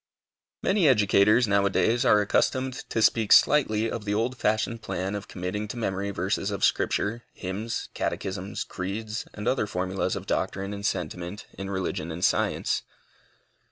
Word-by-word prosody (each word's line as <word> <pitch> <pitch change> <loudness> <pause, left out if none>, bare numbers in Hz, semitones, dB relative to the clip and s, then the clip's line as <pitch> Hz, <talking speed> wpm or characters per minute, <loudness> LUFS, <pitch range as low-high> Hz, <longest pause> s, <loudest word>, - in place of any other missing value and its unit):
Many 190 -4 +3
educators 105 -1 +4
now 100 -1 +3
a - - +1
days 115 +5 +2
are 105 - +5
accustomed 130 +5 +1 0.2
to 115 - +1
speak 110 -2 +3
slightly 115 -7 +5
of 115 -1 -4
the 105 0 -1
old 120 +4 0
fashioned 110 0 0
plan 95 -2 -3
of 100 -2 -5
committing 95 +3 -4
to 115 - -6
memory 100 -3 -2
verses 100 +1 -1
of 100 -3 +1
Scripture, 115 +3 0
hymns, 100 +5 -4
catechisms, 95 +2 -3
creeds, 105 +4 -5
and 105 - -5
other 130 -5 +1
formulas 95 0 -1
of - - -6
doctrine 100 +1 -2
and 100 +1 -2
sentiment 90 +2 -4
in 95 0 -6
religion 95 -4 -3
and 85 +3 -1
science. - - +1
105 Hz, 155 wpm, -26 LUFS, 95-110 Hz, 0.2 s, are